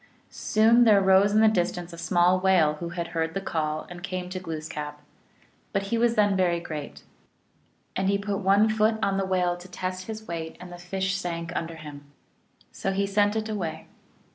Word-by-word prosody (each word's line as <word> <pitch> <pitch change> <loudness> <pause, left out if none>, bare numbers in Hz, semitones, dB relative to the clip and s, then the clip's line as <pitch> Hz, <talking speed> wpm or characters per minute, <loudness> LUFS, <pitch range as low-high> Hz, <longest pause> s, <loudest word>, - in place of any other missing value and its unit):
1 - - -37
Soon 225 +3 +4
there 215 -4 +6
rose 190 +1 +5
in 215 +1 +4
the 220 - +6
distance 175 -4 -1
a - - -9
small 175 +1 +3
whale, 185 -5 +4
who 170 - -4
had 170 0 -4
heard 165 0 -2
the - - 0
call, 155 -5 -2
and 175 0 -10
came 185 -1 -5
to 185 - -3
Glooskap; 155 -3 -6 0.7
but 195 -1 0
he 200 +4 -1
was 235 0 +2
then 205 -2 +3
very 175 -2 +2
great, 155 -4 -7 0.9
and 190 +1 0
he 200 - +2
put 200 0 -3
one 200 +2 +4
foot 215 0 +2
on 195 0 +1
the 195 - 0
whale 180 -2 +1
to 175 +1 -12
test 185 0 -5
his 220 0 -7
weight, 165 -1 -5
and 180 -1 -10
the 175 - -9
fish 190 +1 -2
sank 175 -3 -4
under 165 0 -3
him. 145 -2 -10 0.7
So 195 - -3
he 200 +1 +1
sent 205 +1 +2
it 220 0 -1
away. 185 -7 -4
185 Hz, 200 wpm, -26 LUFS, 170-200 Hz, 0.9 s, there